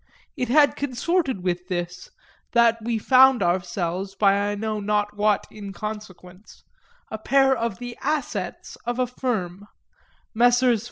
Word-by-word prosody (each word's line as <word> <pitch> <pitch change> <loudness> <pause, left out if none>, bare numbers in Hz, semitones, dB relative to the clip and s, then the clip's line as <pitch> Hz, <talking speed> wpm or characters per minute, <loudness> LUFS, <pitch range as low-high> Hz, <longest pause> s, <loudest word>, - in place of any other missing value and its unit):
It 250 - -2
had 290 +2 +4
consorted 280 - -1
with 180 0 -2
this 175 -1 -5 0.4
that 235 -1 +4
we 230 0 -1
found 260 0 +5
ourselves, 180 +2 -2
by 195 0 +4 0.2
I 205 - -2
know 215 +1 -3
not 210 0 -1
what 210 -1 +1
inconsequence, 200 -2 -9 0.5
a 220 - -5
pair 270 +3 +3
of 230 -5 -3
the 245 +1 -7
"assets" 305 -4 -3
of 240 0 -3
a 255 - +2
firm; 205 -7 -4 0.7
Messrs. 245 0 +4
215 Hz, 130 wpm, -23 LUFS, 195-245 Hz, 0.7 s, found